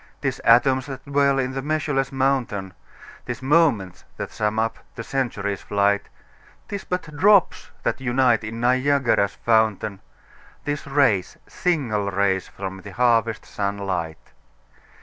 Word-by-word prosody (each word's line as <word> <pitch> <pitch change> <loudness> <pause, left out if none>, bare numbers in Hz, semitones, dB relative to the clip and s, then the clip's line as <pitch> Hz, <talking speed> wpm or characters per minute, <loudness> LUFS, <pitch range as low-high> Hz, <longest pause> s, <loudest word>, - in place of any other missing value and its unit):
'Tis - - -2
atoms 130 +3 +4
that 135 -2 -8
dwell 140 -1 +2
in 130 -1 0
the 135 0 -4
measureless 145 -2 -1
mountain, 130 -8 -1 0.5
'Tis 120 0 -5
moments 135 - +2
that - - -5
sum 105 0 -1
up 115 0 -1 0.2
the 115 - -6
century's 105 -7 -2
flight; 100 0 +1 0.6
'Tis 200 -1 -5
but 165 -4 -4
drops 195 -1 +3
that - - -1
unite 125 -3 +2
in 110 +2 -6
Niagara's 130 -4 +2
fountain, 110 -3 +1 0.7
'Tis 145 0 -3
rays, 135 -10 +2
single 125 - -1
rays, 95 -1 0
from 95 0 -7
the 100 - -10
harvest 115 0 +2
sun 100 0 -3
light. 90 -5 -4
120 Hz, 130 wpm, -23 LUFS, 100-140 Hz, 0.7 s, atoms